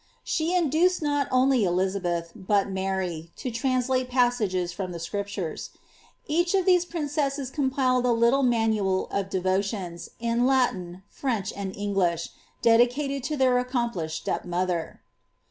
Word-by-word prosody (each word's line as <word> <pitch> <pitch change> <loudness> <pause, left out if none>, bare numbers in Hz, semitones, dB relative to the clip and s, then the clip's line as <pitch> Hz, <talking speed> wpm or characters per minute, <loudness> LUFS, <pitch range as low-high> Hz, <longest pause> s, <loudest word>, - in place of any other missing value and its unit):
She 330 +2 0
induced 345 +1 +2
not 290 -2 +1
only 255 0 +3
Elizabeili, 180 -2 0
but 200 +1 +1
Mary, 190 -4 -2
to 255 - -5
translate 255 +1 0
passages 230 -8 +1
from 180 0 -5
the 170 - -6
Scriptures. 200 -1 -4 0.6
Each 345 +5 +1
of 380 -2 +2
these 360 -2 +4
princesses 290 -5 -2
compiled 260 -3 +1
a - - +3
little 235 +4 +3
manual 220 -6 +1
of 195 -1 -2
devotions, 190 -1 -2
in 235 0 0
I^tin, 195 -9 +1
French, 220 -8 -2
and 195 -1 -5
English, 190 -5 0 0.3
dedicated 250 +4 +3
to 305 0 -2
their 255 -2 +4
accomplished 235 -11 -2
step - - -2
mother.' 175 -2 -2
230 Hz, 130 wpm, -26 LUFS, 190-265 Hz, 0.6 s, these